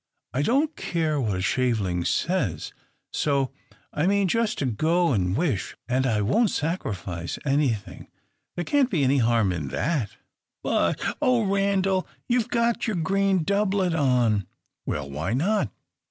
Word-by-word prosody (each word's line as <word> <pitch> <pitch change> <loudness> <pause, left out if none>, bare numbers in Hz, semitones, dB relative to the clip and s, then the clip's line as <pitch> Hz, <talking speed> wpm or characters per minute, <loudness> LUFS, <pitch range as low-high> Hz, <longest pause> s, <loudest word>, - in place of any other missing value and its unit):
I 130 - 0
don't 280 - +1
care 155 -4 -1
what 105 -6 -1
a - - -2
shaveling 105 -8 0
says: 125 - -1 0.4
so 140 -3 +1 0.4
I 155 +4 +1
mean 200 0 +3
just 230 +3 0
to 140 - -1
go 160 +8 +2
and 95 -1 0
wish, 140 - -1
and 130 +1 +1
I 110 -4 +1
won't 200 - +3
sacrifice 100 - -3
anything. 135 -8 -1 0.5
There 175 - -3
can't 280 - +2
be 165 - +1
any 135 +1 +3
harm 115 -4 +3
in 80 -5 -3
that!" 135 - -2 0.5
"But, - - +1 0.2
oh 250 -3 +3
Randal, 195 -1 +1 0.2
you've 240 -2 +1
got 235 0 +1
your 215 - 0
green 190 +1 +1
doublet 200 -1 +1
on!" 120 - +2 0.4
"Well! 70 -1 -2
why 75 - -2
not?" 155 - +1
150 Hz, 145 wpm, -25 LUFS, -, 0.5 s, mean